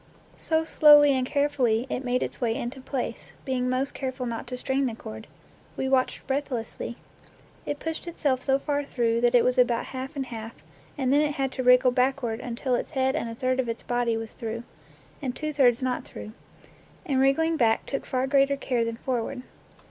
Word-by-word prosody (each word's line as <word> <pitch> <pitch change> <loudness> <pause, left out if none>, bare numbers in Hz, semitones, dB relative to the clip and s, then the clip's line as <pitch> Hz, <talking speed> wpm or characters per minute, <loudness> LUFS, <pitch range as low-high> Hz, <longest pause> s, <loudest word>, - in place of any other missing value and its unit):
So 320 0 +1
slowly 295 -2 +7
and 260 -1 +1
carefully 260 -6 +1
it 255 - -3
made 250 0 0
its - - -6
way 230 -2 +1
into 250 +3 -5
place, 260 -1 -5
being 250 -2 0
most 260 +2 -1
careful 260 -1 -4
not 235 -1 -4
to 250 0 -5
strain 265 +1 0
the 230 - -4
cord. 110 - -9 0.5
We 265 - -1
watched 265 -1 +1
breathlessly. 250 -4 -3 0.7
It 290 - -2
pushed 325 +3 -4
itself 285 -6 0
so 270 0 +2
far 290 +1 -1
through 235 -4 0
that 240 +1 +3
it 240 - +6
was 250 +1 +2
about 240 -2 +3
half 265 +4 -5
and 270 -2 -2
half, 225 -2 -7 0.4
and 265 -1 +1
then 290 - +5
it 300 -1 +1
had 270 -1 -1
to 260 - -3
wriggle 250 0 +6
backward 250 -2 0
till 255 +1 -1
its 245 - -1
head 265 -1 0
and 275 -7 -2
a 230 - -6
third 255 +1 0
of 250 -2 0
its 230 - -4
body 240 -2 0
was 225 -1 -6
through, 230 -1 -5 0.6
and 260 -3 -3
two 305 0 -3
thirds 260 -3 +3
not 255 -1 -1
through; 215 - -9 0.7
and 275 -6 +1
wriggling 320 +5 +3
back 230 -6 +2
took 275 - -3
far 255 0 0
greater 275 0 +3
care 250 -4 0
than 230 0 -3
forward. 250 +1 -3
255 Hz, 200 wpm, -26 LUFS, 240-275 Hz, 0.7 s, slowly